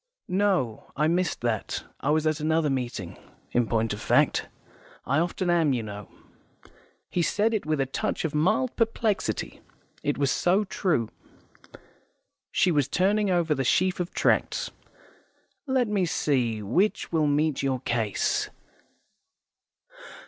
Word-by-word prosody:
"No, 185 Hz, -, 0 dB
I 150 Hz, +1 st, +2 dB
missed 175 Hz, +2 st, 0 dB
that. 115 Hz, -3 st, -2 dB, 0.2 s
I 140 Hz, -, -2 dB
was 155 Hz, +1 st, +2 dB
at 155 Hz, -1 st, +1 dB
another 155 Hz, -1 st, +1 dB
meeting, 120 Hz, -9 st, -4 dB, 0.3 s
in 120 Hz, -1 st, +2 dB
point 115 Hz, -1 st, 0 dB
of 105 Hz, -, -7 dB
fact. -, -, +2 dB, 0.6 s
I 140 Hz, +3 st, +2 dB
often 175 Hz, +2 st, -1 dB
am, 165 Hz, -5 st, +3 dB
you 120 Hz, -3 st, -1 dB
know." 105 Hz, -1 st, -8 dB, 1.0 s
He 180 Hz, -, -1 dB
said 210 Hz, +8 st, +1 dB
it 210 Hz, -8 st, -2 dB
with 155 Hz, -2 st, 0 dB
a 135 Hz, -, +2 dB
touch 135 Hz, -, -2 dB
of 160 Hz, -, -2 dB
mild 215 Hz, +11 st, +1 dB
perplexity. 225 Hz, -2 st, -1 dB, 0.4 s
It 145 Hz, -, -1 dB
was 140 Hz, -1 st, +1 dB
so 190 Hz, +4 st, +2 dB
true. 180 Hz, -, 0 dB, 1.4 s
She 185 Hz, -, +2 dB
was 145 Hz, -5 st, +2 dB
turning 200 Hz, +6 st, +2 dB
over 170 Hz, -4 st, +2 dB
the 135 Hz, -2 st, -1 dB
sheaf 185 Hz, +8 st, +2 dB
of 180 Hz, 0 st, -2 dB
tracts. -, -, +1 dB, 1.0 s
"Let 260 Hz, -3 st, +2 dB
me 200 Hz, -4 st, +1 dB
see: 120 Hz, -9 st, 0 dB
which 180 Hz, -, 0 dB
will 160 Hz, -3 st, +2 dB
meet 145 Hz, 0 st, +1 dB
your 130 Hz, -2 st, -1 dB
case? 115 Hz, -5 st, 0 dB
155 Hz, 140 wpm, -26 LUFS, 130-185 Hz, 1.4 s, am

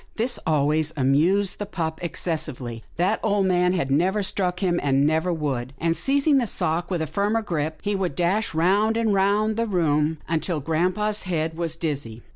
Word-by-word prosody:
" -, -, -36 dB
This 240 Hz, +2 st, 0 dB
always 155 Hz, +1 st, +2 dB
amused 165 Hz, +9 st, +2 dB
the 205 Hz, -, -4 dB
pup 160 Hz, -5 st, -3 dB
excessively. 145 Hz, -9 st, -3 dB
That 185 Hz, +6 st, +1 dB
old 205 Hz, -2 st, +1 dB
man 180 Hz, -1 st, +2 dB
had 170 Hz, -7 st, -1 dB
never 185 Hz, +8 st, +2 dB
struck 180 Hz, -2 st, 0 dB
him, 175 Hz, -3 st, +1 dB
and 140 Hz, 0 st, +2 dB
never 160 Hz, +4 st, +1 dB
would, 135 Hz, -6 st, -3 dB
and, 165 Hz, +2 st, 0 dB
seizing 280 Hz, -, +3 dB
the 240 Hz, -, -1 dB
sock 170 Hz, -1 st, -1 dB
with 175 Hz, -4 st, -1 dB
a -, -, -1 dB
firmer 205 Hz, +7 st, 0 dB
grip, 155 Hz, -5 st, -2 dB
he 205 Hz, 0 st, 0 dB
would 185 Hz, -7 st, -2 dB
dash 180 Hz, +3 st, 0 dB
round 200 Hz, +7 st, +2 dB
and 225 Hz, -2 st, +1 dB
round 205 Hz, +3 st, +2 dB
the 230 Hz, 0 st, 0 dB
room 160 Hz, -5 st, +1 dB
until 165 Hz, 0 st, -1 dB
grampa's 180 Hz, +8 st, 0 dB
head 160 Hz, -2 st, -1 dB
was 165 Hz, -1 st, -1 dB
dizzy. 140 Hz, -9 st, -3 dB
175 Hz, 185 wpm, -24 LUFS, 155-200 Hz, -, seizing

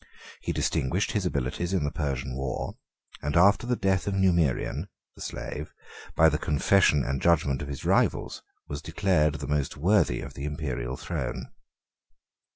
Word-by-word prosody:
He -, -, -2 dB
distinguished 85 Hz, +10 st, 0 dB
his 100 Hz, -4 st, 0 dB
abilities 70 Hz, +5 st, -2 dB
in 90 Hz, -6 st, +1 dB
the 75 Hz, -, -1 dB
Persian 65 Hz, -4 st, -3 dB
war; 65 Hz, +1 st, -3 dB, 0.5 s
and 75 Hz, +3 st, 0 dB
after 100 Hz, +6 st, +5 dB
the 125 Hz, -, +2 dB
death 95 Hz, -4 st, +1 dB
of 100 Hz, -, 0 dB
Numerian, 85 Hz, -8 st, +1 dB, 0.3 s
the -, -, -15 dB
slave, -, -, -6 dB, 0.4 s
by -, -, +6 dB
the -, -, +1 dB
confession 75 Hz, 0 st, +3 dB
and 70 Hz, 0 st, -2 dB
judgment 75 Hz, -5 st, +2 dB
of 70 Hz, -, -5 dB
his 70 Hz, -2 st, -6 dB
rivals, -, -, +1 dB, 0.3 s
was 70 Hz, 0 st, -5 dB
declared 80 Hz, -3 st, +1 dB
the 70 Hz, -2 st, -5 dB
most 75 Hz, -1 st, -1 dB
worthy 85 Hz, -, +2 dB
of -, -, -8 dB
the 70 Hz, -, -6 dB
Imperial 65 Hz, -5 st, -3 dB
throne. -, -, -4 dB
75 Hz, 160 wpm, -27 LUFS, 70-90 Hz, 0.5 s, by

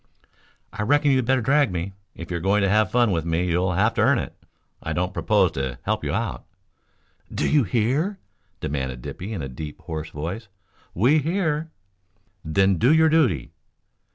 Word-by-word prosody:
"I -, -, -4 dB
reckon 145 Hz, +6 st, +3 dB
you'd 130 Hz, -3 st, +2 dB
better 130 Hz, -1 st, +2 dB
drag 140 Hz, -1 st, +3 dB
me. 90 Hz, +2 st, -4 dB, 0.2 s
If 85 Hz, +1 st, -8 dB
you're 85 Hz, -, -1 dB
going 100 Hz, +4 st, +2 dB
to 100 Hz, -, +2 dB
have 105 Hz, 0 st, +3 dB
fun 120 Hz, -1 st, +3 dB
with 85 Hz, -3 st, 0 dB
me 85 Hz, +2 st, 0 dB
you'll 90 Hz, +1 st, +1 dB
have 105 Hz, +6 st, +2 dB
to -, -, 0 dB
earn -, -, +4 dB
it. -, -, -4 dB, 0.5 s
I -, -, -3 dB
don't -, -, -1 dB
propose -, -, +2 dB
to 65 Hz, -2 st, -3 dB
help -, -, -1 dB
you 75 Hz, -, -2 dB
out." 105 Hz, +3 st, -2 dB, 0.9 s
"Do -, -, -1 dB
you 150 Hz, -3 st, +4 dB
hear?" 130 Hz, -, 0 dB, 0.4 s
demanded 65 Hz, -3 st, -3 dB
Dippy 95 Hz, +5 st, -6 dB
in 95 Hz, -9 st, -4 dB
a -, -, -3 dB
deep, 75 Hz, +3 st, -8 dB
hoarse 80 Hz, -1 st, -5 dB
voice. 90 Hz, +10 st, -5 dB, 0.5 s
"We 130 Hz, -, +4 dB
hear." 160 Hz, -1 st, -1 dB, 0.7 s
"Then 95 Hz, +3 st, +2 dB
do 125 Hz, -, +4 dB
your 160 Hz, 0 st, +5 dB
duty!" 130 Hz, -, +2 dB
100 Hz, 180 wpm, -23 LUFS, 85-135 Hz, 0.9 s, your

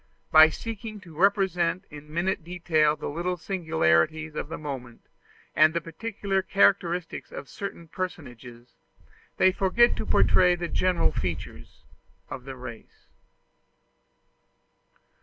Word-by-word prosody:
By 155 Hz, 0 st, +9 dB
seeking 220 Hz, +3 st, -7 dB
to 170 Hz, -4 st, -14 dB
represent 185 Hz, -1 st, +1 dB
in 150 Hz, 0 st, -11 dB
minute 175 Hz, +2 st, -1 dB
detail 165 Hz, -3 st, +1 dB
the -, -, -6 dB
little 175 Hz, +4 st, -2 dB
singularities 160 Hz, -, +1 dB
of 150 Hz, -, -5 dB
the 165 Hz, -, -5 dB
moment 130 Hz, -6 st, -7 dB, 0.5 s
and 155 Hz, +1 st, +5 dB
the -, -, +2 dB
peculiar 195 Hz, +3 st, -3 dB
characteristics 180 Hz, -3 st, +1 dB
of 135 Hz, -, -8 dB
certain 170 Hz, +1 st, -7 dB
personages, 125 Hz, -9 st, -7 dB, 0.6 s
they 185 Hz, -, +5 dB
forget 195 Hz, +6 st, +3 dB
to -, -, -4 dB
portray 180 Hz, -1 st, +4 dB
the 175 Hz, -1 st, -4 dB
general 180 Hz, -, +1 dB
features 85 Hz, -1 st, -6 dB, 0.5 s
of 125 Hz, -, -7 dB
the 135 Hz, -1 st, -7 dB
race. 125 Hz, -3 st, -11 dB
170 Hz, 120 wpm, -26 LUFS, 150-185 Hz, 0.6 s, By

